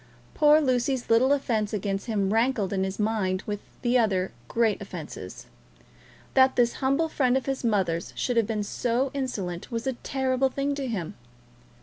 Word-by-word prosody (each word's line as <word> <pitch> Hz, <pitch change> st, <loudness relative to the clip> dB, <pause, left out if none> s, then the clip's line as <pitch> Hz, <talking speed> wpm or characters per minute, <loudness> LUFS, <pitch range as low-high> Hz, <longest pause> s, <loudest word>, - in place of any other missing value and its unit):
Poor 300 Hz, 0 st, +6 dB
Lucy's 255 Hz, -3 st, 0 dB
little 245 Hz, +4 st, +5 dB
offence 225 Hz, -7 st, 0 dB
against 200 Hz, 0 st, -2 dB
him 205 Hz, -3 st, 0 dB
rankled 225 Hz, -4 st, +1 dB
in 190 Hz, -1 st, 0 dB
his 190 Hz, 0 st, -3 dB
mind 210 Hz, -4 st, 0 dB
with 205 Hz, -1 st, -3 dB, 0.2 s
the 245 Hz, +1 st, +3 dB
other 190 Hz, -5 st, +1 dB, 0.2 s
great 225 Hz, -, +1 dB
offences. 155 Hz, -, -8 dB, 0.9 s
That 260 Hz, 0 st, +5 dB
this 240 Hz, -1 st, +3 dB
humble 275 Hz, +5 st, +2 dB
friend 260 Hz, -5 st, +2 dB
of 265 Hz, -, -3 dB
his 270 Hz, -1 st, -2 dB
mother's 190 Hz, -7 st, 0 dB
should 245 Hz, -, -1 dB
have 225 Hz, -3 st, +3 dB
been 215 Hz, -2 st, -1 dB
so 245 Hz, +5 st, -1 dB
insolent 200 Hz, -11 st, -4 dB
was 230 Hz, 0 st, -3 dB
a 265 Hz, -, 0 dB
terrible 265 Hz, +1 st, 0 dB
thing 280 Hz, +2 st, -1 dB
to 280 Hz, -1 st, -3 dB
him. 190 Hz, -9 st, -3 dB
230 Hz, 165 wpm, -26 LUFS, 200-265 Hz, 0.9 s, Poor